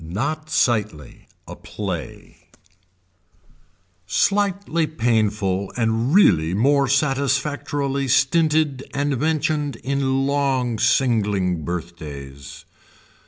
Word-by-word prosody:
NOT 145 - -4
SIGHTLY 105 - -1 0.2
A - - -8
PLAY - - -7 1.6
Slightly 195 - 0
painful 105 -8 0
and 115 +2 0
really 90 - +4
more 140 +5 +3
satisfactorily 140 0 0
stinted 145 +1 +2
and 140 -2 -1
mentioned 155 -1 0
in 135 0 0
long 135 -5 0
singling 100 - +1
birthdays. 70 -6 -8
135 Hz, 75 wpm, -21 LUFS, 100-145 Hz, 1.6 s, really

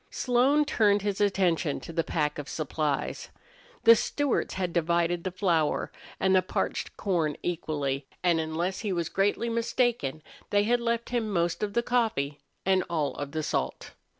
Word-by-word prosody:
Slone 265 +4 +2
turned 205 -8 +3
his 205 -1 -1
attention 180 -6 +1
to 165 - -8
the 165 0 +1
pack 150 -2 -1
of 145 - -6
supplies. 150 -2 -2 0.5
The 230 0 +9
Stewarts 285 +4 -1
had 180 -2 -2
divided 170 0 +1
the 185 - -1
flour 175 -5 0 0.3
and 190 0 +3
the 185 - +5
parched 185 - -3
corn 165 -7 0
equally, 145 -5 -2 0.2
and 175 -2 +3
unless 165 +4 -2
he 210 -4 -2
was 170 -3 -1
greatly 205 +4 +1
mistaken 230 - 0 0.3
they 205 0 +3
had 240 +3 +2
left 235 0 -1
him 235 -3 -1
most 175 -3 0
of 205 -1 -2
the 235 - +1
coffee 220 - 0 0.3
and 190 -1 +3
all 155 -4 0
of 145 -1 -5
the 155 0 -2
salt. - - -2
180 Hz, 165 wpm, -28 LUFS, 160-220 Hz, 0.5 s, The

